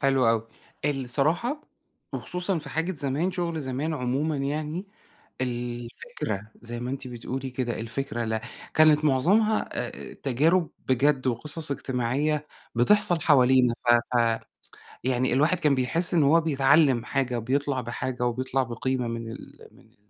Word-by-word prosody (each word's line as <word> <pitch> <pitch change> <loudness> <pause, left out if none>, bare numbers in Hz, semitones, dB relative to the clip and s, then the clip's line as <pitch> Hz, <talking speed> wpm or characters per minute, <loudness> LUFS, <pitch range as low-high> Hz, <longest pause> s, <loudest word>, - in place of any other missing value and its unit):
حلو 135 -3 +3
أوي، 115 -1 +1 0.4
الصراحة 145 - 0 0.5
وخصوصًا 180 0 -2
في 150 - -9
حاجة 165 +4 -1
زمان، 145 +3 -1
شغل 170 -3 -2
زمان 140 +4 -2
عمومًا 145 +3 -1
يعني، 150 +6 -3 0.5
الفكرة- 120 - -4
زي 120 0 -6
ما 125 +1 -3
أنتِ 135 -1 -5
بتقولي 130 +2 -5
كده- 125 -2 -3
الفكرة، 115 0 -3
لا، 110 0 -1 0.3
كانت 155 -1 +5
معظمها 195 +11 +3
آآ 70 -1 -5
تجارب 160 +7 +1 0.2
بجد 130 +1 +2
وقصص 150 +6 -1
اجتماعية 140 +3 -1 0.3
بتحصل 175 - +4
حوالينا 130 -5 +4
ف 120 +1 +3
ف 115 -1 +2 0.6
يعني 130 0 +1
الواحد 155 +7 +3
كان 150 -4 +3
بيحس 165 +8 +2
إن 165 -3 +4
هو 160 +4 +5
بيتعلّم 140 -4 +3
حاجة، 130 -2 -1
بيطلع 135 +3 -1
بحاجة 125 +1 -3
وبيطلع 130 +2 0
بقيمة 125 +1 -2
من 115 -1 -5
ال - - -12
من - - -21
ال - - -26
135 Hz, 135 wpm, -26 LUFS, 120-155 Hz, 0.6 s, كانت